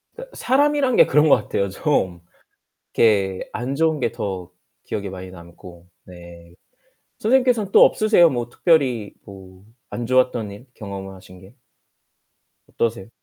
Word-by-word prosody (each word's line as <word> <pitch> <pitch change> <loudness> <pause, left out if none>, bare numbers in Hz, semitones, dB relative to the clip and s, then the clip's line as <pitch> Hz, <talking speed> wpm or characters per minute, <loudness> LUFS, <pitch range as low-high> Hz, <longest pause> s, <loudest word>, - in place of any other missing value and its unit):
그 - - -10
사람이란 275 -1 +1
게 - - +6
그런 150 +2 +3
것 - - +7
같아요. 100 0 -2
좀 95 - -1 0.7
이렇게 100 -4 +1
안 125 +4 -4
좋은 160 0 0
게 115 - -1
더 95 -3 -5 0.3
기억에 100 -2 -5
많이 95 -1 -9
남고 85 0 -14 0.2
네. 85 -1 -14 0.7
선생님께서는 240 -3 +2
또 - - +7
없으세요 215 -6 +4
뭐 120 -2 -3
특별히 125 - +1
뭐 95 -1 -14 0.3
안 120 -1 -5
좋았던 125 -4 +1
일, 105 +6 -12
경험을 100 -2 -8
하신 90 -1 -15
게? 95 +5 -17 1.1
어떠세요? 115 -3 -3
110 Hz, 270 characters per minute, -21 LUFS, 95-155 Hz, 1.1 s, 것